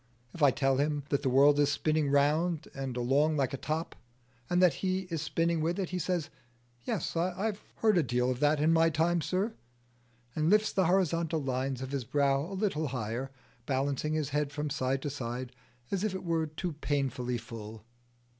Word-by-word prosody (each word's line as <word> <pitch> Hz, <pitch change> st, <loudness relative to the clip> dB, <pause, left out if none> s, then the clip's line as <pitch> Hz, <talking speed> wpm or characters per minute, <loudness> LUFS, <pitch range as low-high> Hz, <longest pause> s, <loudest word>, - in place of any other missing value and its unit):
If 170 Hz, -, -9 dB
I 145 Hz, -, +7 dB
tell 135 Hz, 0 st, +1 dB
him 145 Hz, 0 st, 0 dB
that 140 Hz, -, +1 dB
the 135 Hz, -, +1 dB
world 140 Hz, +3 st, +5 dB
is 145 Hz, -1 st, +3 dB
spinning 155 Hz, 0 st, +1 dB
round 150 Hz, +4 st, +2 dB
and 135 Hz, -2 st, -4 dB
along 140 Hz, +6 st, +2 dB
like 135 Hz, -1 st, 0 dB
a -, -, 0 dB
top, 155 Hz, +4 st, -3 dB, 0.5 s
and 175 Hz, -, +2 dB
that 180 Hz, -4 st, +5 dB
he 185 Hz, 0 st, 0 dB
is 165 Hz, -3 st, -1 dB
spinning 165 Hz, +1 st, 0 dB
with 170 Hz, +3 st, 0 dB
it, 190 Hz, -3 st, -2 dB
he 180 Hz, -, -2 dB
says, 175 Hz, -2 st, -2 dB, 0.5 s
"Yes, -, -, -2 dB
I've 190 Hz, +5 st, -1 dB
heard 215 Hz, -5 st, +3 dB
a -, -, +5 dB
deal 125 Hz, -2 st, 0 dB
of 125 Hz, -, -3 dB
that 150 Hz, +1 st, +3 dB
in 155 Hz, +2 st, +3 dB
my 165 Hz, 0 st, +5 dB
time, 165 Hz, +2 st, +1 dB
sir," 195 Hz, +7 st, -1 dB, 0.8 s
and 155 Hz, +1 st, +1 dB
lifts 210 Hz, +1 st, +4 dB
the 190 Hz, -3 st, +2 dB
horizontal 170 Hz, -4 st, +1 dB
lines 130 Hz, 0 st, -2 dB
of 130 Hz, -, -6 dB
his 140 Hz, -3 st, -2 dB
brow 140 Hz, +2 st, +1 dB
a 195 Hz, -, -4 dB
little 185 Hz, -7 st, 0 dB
higher, 125 Hz, +1 st, -3 dB, 0.4 s
balancing 140 Hz, +2 st, 0 dB
his 155 Hz, -3 st, -1 dB
head 150 Hz, 0 st, -1 dB
from 150 Hz, 0 st, -3 dB
side 135 Hz, -1 st, -1 dB
to 145 Hz, -, -2 dB
side 125 Hz, -1 st, -5 dB, 0.4 s
as 195 Hz, 0 st, -1 dB
if 210 Hz, -3 st, -1 dB
it 190 Hz, -, -5 dB
were 165 Hz, -2 st, 0 dB
too 160 Hz, +3 st, -4 dB
painfully 135 Hz, -4 st, -1 dB
full. 110 Hz, -1 st, -9 dB
150 Hz, 195 wpm, -30 LUFS, 135-170 Hz, 0.8 s, I